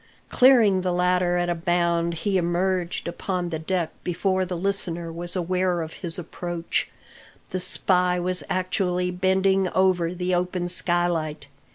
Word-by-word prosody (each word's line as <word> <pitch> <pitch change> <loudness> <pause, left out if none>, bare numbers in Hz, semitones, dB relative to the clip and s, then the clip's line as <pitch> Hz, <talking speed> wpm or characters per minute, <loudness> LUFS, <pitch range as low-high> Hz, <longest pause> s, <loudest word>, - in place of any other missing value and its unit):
Clearing 230 -7 +5
the 180 0 -1
ladder 180 0 +2
at 175 0 0
a 175 - +1
bound, 170 0 0
he 200 -2 +1
emerged 175 0 -1
upon 180 0 -3
the 160 -2 -3
deck 170 0 -1
before 185 +2 0
the 180 -1 -4
listener 175 -3 -2
was 175 +2 -3
aware 180 0 0
of 160 - -8
his 170 -2 -3
approach. 175 0 -3 0.6
The 185 - -2
spy 180 0 +1
was 180 +1 0
actually 180 -1 0
bending 190 +1 +2
over 180 -2 +2
the 180 +1 -1
open 180 0 -1
skylight. 175 -4 0
180 Hz, 145 wpm, -24 LUFS, 175-185 Hz, 0.6 s, Clearing